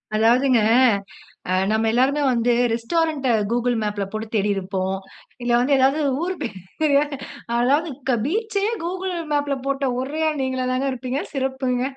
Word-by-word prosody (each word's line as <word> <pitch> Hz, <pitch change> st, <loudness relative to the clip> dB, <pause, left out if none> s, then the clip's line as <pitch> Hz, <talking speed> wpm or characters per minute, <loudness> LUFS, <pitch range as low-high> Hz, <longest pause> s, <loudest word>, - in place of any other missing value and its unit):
அதாவதுங்க 240 Hz, +3 st, +4 dB, 0.9 s
அ -, -, +1 dB, 0.2 s
நம்ம 220 Hz, +1 st, +1 dB
எல்லோருமே 265 Hz, +5 st, +2 dB
வந்து 240 Hz, 0 st, +2 dB, 0.2 s
ரெஸ்டாரண்ட்ட 290 Hz, +3 st, 0 dB, 0.2 s
கூகிள் 245 Hz, 0 st, +1 dB
மேப்ல 205 Hz, -1 st, -2 dB
போட்டு 215 Hz, +1 st, -4 dB
தேடிருப்போம். 195 Hz, -2 st, -1 dB, 0.5 s
இல்ல 240 Hz, 0 st, 0 dB
வந்து 275 Hz, +3 st, +3 dB
ஏதாவது 270 Hz, +4 st, +3 dB, 0.2 s
ஊர் 370 Hz, +2 st, -1 dB
பேரு 235 Hz, -, 0 dB, 0.6 s
அதாவது 270 Hz, -1 st, +1 dB
பீச்சயே 420 Hz, +4 st, -1 dB
கூகிள் 370 Hz, +1 st, -3 dB, 0.2 s
மேப்ல 290 Hz, -1 st, 0 dB
போட்ட 275 Hz, -1 st, 0 dB
ஒரே 285 Hz, +5 st, -4 dB
ஆள் 300 Hz, -3 st, -2 dB
நீங்களாதாங்க 260 Hz, 0 st, -1 dB
இருப்பீங்க 255 Hz, +2 st, -3 dB
சிறப்புங்க. 265 Hz, -2 st, -1 dB
260 Hz, 125 wpm, -22 LUFS, 235-290 Hz, 0.9 s, அதாவதுங்க